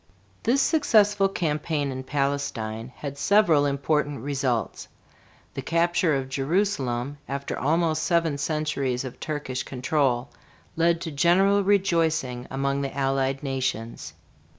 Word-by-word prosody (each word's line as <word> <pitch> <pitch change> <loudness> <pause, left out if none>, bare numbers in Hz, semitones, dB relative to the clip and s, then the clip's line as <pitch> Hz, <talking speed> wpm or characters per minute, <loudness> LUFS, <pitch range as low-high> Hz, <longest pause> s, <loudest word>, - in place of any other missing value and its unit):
This 260 +4 +2
successful 210 -10 +3
campaign 150 -4 -1
in 130 0 -5
Palestine 130 -5 -2
had 140 -1 -7
several 170 -9 +4
important 145 0 0
results. 130 -5 -2 0.7
The - - -4
capture 170 +1 +1
of 135 -1 -2
Jerusalem 140 -3 -1
after 140 0 -3
almost 160 0 +1
seven 165 -5 +1
centuries 140 -4 -1
of 130 - -8
Turkish 145 -4 -3
control 130 -1 0 0.4
led 170 0 +2
to 165 - -4
general 190 +7 +3
rejoicing 165 -10 +1
among 140 +1 -1
the 140 0 -4
Allied 135 0 0
nations. 130 -4 -3
145 Hz, 115 wpm, -25 LUFS, 135-170 Hz, 0.7 s, several